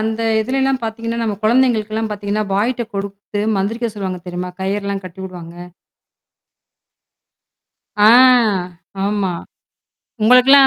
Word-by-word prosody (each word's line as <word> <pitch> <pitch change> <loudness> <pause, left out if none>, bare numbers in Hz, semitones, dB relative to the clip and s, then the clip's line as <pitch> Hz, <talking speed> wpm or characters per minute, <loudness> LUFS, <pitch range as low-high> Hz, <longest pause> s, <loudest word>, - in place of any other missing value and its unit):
அந்த 220 +1 -2 0.2
இதுலலாம் 265 +3 0
பாத்தீங்கன்னா, 230 +1 -4
நம்ம 215 -2 -1
கொழந்தைகளுக்கெல்லாம் 225 -2 +1
பாத்தீங்கன்னா 205 +1 -2
பாய்ட்ட 235 +4 0
கொடுத்து 200 +1 -5 0.2
மந்திரிக்க 225 +5 -1
சொல்லுவாங்க 190 -3 -4
தெரியுமா? 180 +1 -4
கயிறலாம் 200 +1 -2
கட்டி 185 +1 -10
உடுவாங்க. 175 -1 -10 2.3
ஆ 210 +1 +6 1.0
ஆமா. 200 -3 -1 0.9
உங்களுக்கெல்லாம் 250 +4 +7
210 Hz, 95 wpm, -18 LUFS, 195-230 Hz, 2.3 s, உங்களுக்கெல்லாம்